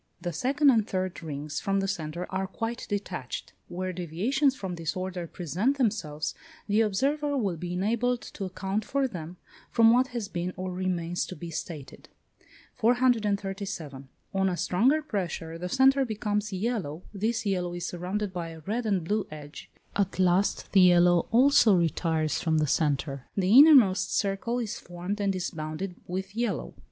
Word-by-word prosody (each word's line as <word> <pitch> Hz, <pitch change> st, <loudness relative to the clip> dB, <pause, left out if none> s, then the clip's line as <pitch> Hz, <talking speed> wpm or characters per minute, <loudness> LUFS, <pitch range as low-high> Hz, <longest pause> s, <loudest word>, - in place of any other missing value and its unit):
The 175 Hz, -1 st, -4 dB
second 275 Hz, -, +3 dB
and 220 Hz, -4 st, +2 dB
third 185 Hz, -2 st, -3 dB
rings 150 Hz, -1 st, -4 dB
from 195 Hz, -1 st, 0 dB
the 195 Hz, -, -1 dB
centre 170 Hz, -1 st, -3 dB
are 190 Hz, 0 st, -1 dB
quite 225 Hz, +5 st, -4 dB
detached. 190 Hz, -, -4 dB
Where 185 Hz, +1 st, -4 dB
deviations 210 Hz, -, 0 dB
from 190 Hz, -7 st, -5 dB
this 165 Hz, -2 st, -3 dB
order 185 Hz, -2 st, -4 dB
present 185 Hz, -, -1 dB
themselves, 165 Hz, -, -1 dB, 0.3 s
the 210 Hz, +2 st, +3 dB
observer 280 Hz, +8 st, +1 dB
will 200 Hz, -8 st, 0 dB
be 175 Hz, +2 st, -5 dB
enabled 235 Hz, +6 st, 0 dB
to 195 Hz, -, -6 dB
account 190 Hz, +3 st, -3 dB
for 275 Hz, +4 st, 0 dB
them, 175 Hz, -5 st, -8 dB, 0.3 s
from 230 Hz, -1 st, +5 dB
what 255 Hz, +2 st, +4 dB
has 235 Hz, -5 st, -4 dB
been 180 Hz, -1 st, -3 dB
or 185 Hz, 0 st, -3 dB
remains 175 Hz, -1 st, -1 dB
to 185 Hz, -, -7 dB
be 170 Hz, -2 st, -7 dB
stated. 155 Hz, -3 st, -7 dB, 0.7 s
437. 200 Hz, -, 0 dB, 0.2 s
On 190 Hz, 0 st, +2 dB
a 180 Hz, -, -2 dB
stronger 260 Hz, -, +2 dB
pressure 170 Hz, -, -4 dB
the 180 Hz, +1 st, -4 dB
centre 270 Hz, +4 st, +4 dB
becomes 210 Hz, -2 st, -2 dB
yellow; 185 Hz, -6 st, -2 dB
this 225 Hz, +3 st, -1 dB
yellow 180 Hz, -3 st, -1 dB
is 175 Hz, 0 st, -4 dB
surrounded 185 Hz, +3 st, -3 dB
by 170 Hz, -2 st, -4 dB
a 160 Hz, -1 st, -10 dB
red 220 Hz, +7 st, -2 dB
and 195 Hz, -5 st, +1 dB
blue 205 Hz, +4 st, -1 dB
edge: 150 Hz, -1 st, -10 dB, 0.3 s
at 200 Hz, -1 st, 0 dB
last, 185 Hz, +1 st, +2 dB
the 195 Hz, -, +6 dB
yellow 175 Hz, -1 st, +5 dB
also 240 Hz, -3 st, +6 dB
retires 160 Hz, -2 st, 0 dB
from 160 Hz, -2 st, +1 dB
the 155 Hz, -, +3 dB
centre; 140 Hz, -2 st, 0 dB
the 195 Hz, +3 st, +3 dB
innermost 265 Hz, -10 st, +7 dB
circle 200 Hz, +4 st, -1 dB
is 230 Hz, -4 st, -3 dB
formed 180 Hz, +4 st, -5 dB
and 195 Hz, -1 st, +1 dB
is 180 Hz, -1 st, -2 dB
bounded 155 Hz, +4 st, -5 dB
with 190 Hz, +3 st, -4 dB
yellow. 230 Hz, -, -2 dB
190 Hz, 165 wpm, -28 LUFS, 175-220 Hz, 0.7 s, innermost